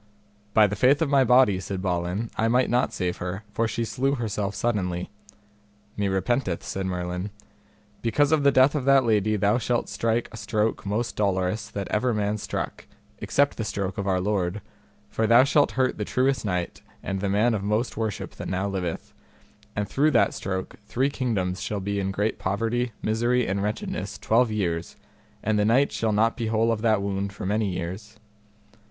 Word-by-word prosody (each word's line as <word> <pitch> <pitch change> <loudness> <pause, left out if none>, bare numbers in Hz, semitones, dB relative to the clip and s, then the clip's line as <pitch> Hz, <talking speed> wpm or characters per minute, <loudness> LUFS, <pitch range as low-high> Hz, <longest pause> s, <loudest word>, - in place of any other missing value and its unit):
By 110 - +7
the 105 0 -1
faith 130 +7 +4
of 145 - -2
my 135 -2 +5
body, 125 -6 +5
said 95 0 -4
Balin, 90 +4 -2
I 110 - +1
might 125 +2 +2
not 125 +1 +2
save 90 -2 -2
her, 90 +4 -5
for 115 +1 +1
she 115 +1 -2
slew 135 +4 0
herself 105 -4 -2
suddenly. 90 -6 -1 0.8
Me 100 -1 0
repenteth, 95 0 0
said 95 -1 -3
Merlin; 90 +1 -3 0.7
because 145 +6 +2
of 160 -2 +4
the 140 0 +5
death 130 +2 +5
of 145 -4 -2
that 135 -1 +5
lady 110 -2 +2
thou 105 +4 +2
shalt 120 0 -1
strike 115 +1 0
a - - -9
stroke 105 0 -1
most 110 +4 -1
dolorous 95 0 0
that 100 -2 -4
ever 115 +2 +1
man 105 0 -1
struck, - - -5 0.3
except 140 0 +1
the 110 - -2
stroke 100 -3 -3
of 100 - -2
our 95 -1 +2
Lord, 95 0 -1 0.4
for 110 - -1
thou 120 +3 +7
shalt 145 +1 +3
hurt 130 -3 0
the - - 0
truest 130 +4 +1
knight 90 -3 -2 0.2
and 95 -1 -3
the 100 - 0
man 110 +4 +3
of 105 - -1
most 105 +4 0
worship 110 -3 -3
that - - -5
now 95 +2 -1
liveth, 90 -4 -4 0.6
and 105 0 -1
through 145 +8 +2
that 120 -6 +3
stroke 95 -1 -4
three 135 +3 0
kingdoms 95 -9 -1
shall 105 - -2
be 100 +1 -2
in 95 -1 -1
great 105 +3 -1
poverty, 115 +5 -1
misery 120 +3 +1
and 100 +1 -1
wretchedness 105 +1 -3
twelve 115 +2 +2
years, 85 -6 -2 0.5
and 110 -1 +1
the - - +3
knight 125 +7 +3
shall 110 -1 0
not 110 +2 +2
be 115 -3 -3
whole 115 +1 +2
of 110 -2 -1
that 110 -3 +2
wound 100 0 -2
for 100 - -7
many 105 +1 0
years. 95 +4 -5
105 Hz, 190 wpm, -25 LUFS, 95-120 Hz, 0.8 s, By